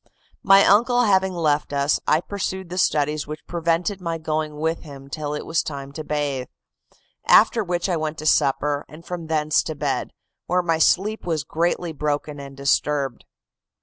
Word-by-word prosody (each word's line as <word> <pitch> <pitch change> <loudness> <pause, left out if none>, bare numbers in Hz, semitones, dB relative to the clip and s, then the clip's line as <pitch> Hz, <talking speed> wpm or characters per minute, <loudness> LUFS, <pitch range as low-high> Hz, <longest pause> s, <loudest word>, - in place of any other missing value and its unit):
"My 195 0 +6
uncle 245 +4 +4
having 190 -3 +2
left 150 -4 0
us, 140 +1 +1
I 155 - +3
pursued 190 -2 -4
the 180 +1 -3
studies 150 -2 +1
which 155 +1 -8
prevented 170 +3 -1
my 165 -2 -2
going 155 -1 -3
with 160 +2 -1
him 140 -3 -12
till 150 -1 -3
it 150 - -5
was 165 -1 +1
time 140 -2 -6
to 155 +2 -6
bathe. 145 -4 -2 0.8
After 225 +1 +5
which 175 -1 -1
I 180 -3 0
went 155 0 -3
to 155 - -7
supper, 145 0 +2
and 160 +2 -13
from 175 -2 -6
thence 155 -1 +2
to 155 - -5
bed, 145 - -2 0.4
where 180 +1 +1
my 165 -2 +1
sleep 205 +7 +2
was 160 -4 0
greatly 170 +3 -1
broken 150 0 -2
and 140 -1 -10
disturbed. 140 -1 0
155 Hz, 175 wpm, -23 LUFS, 145-175 Hz, 0.8 s, My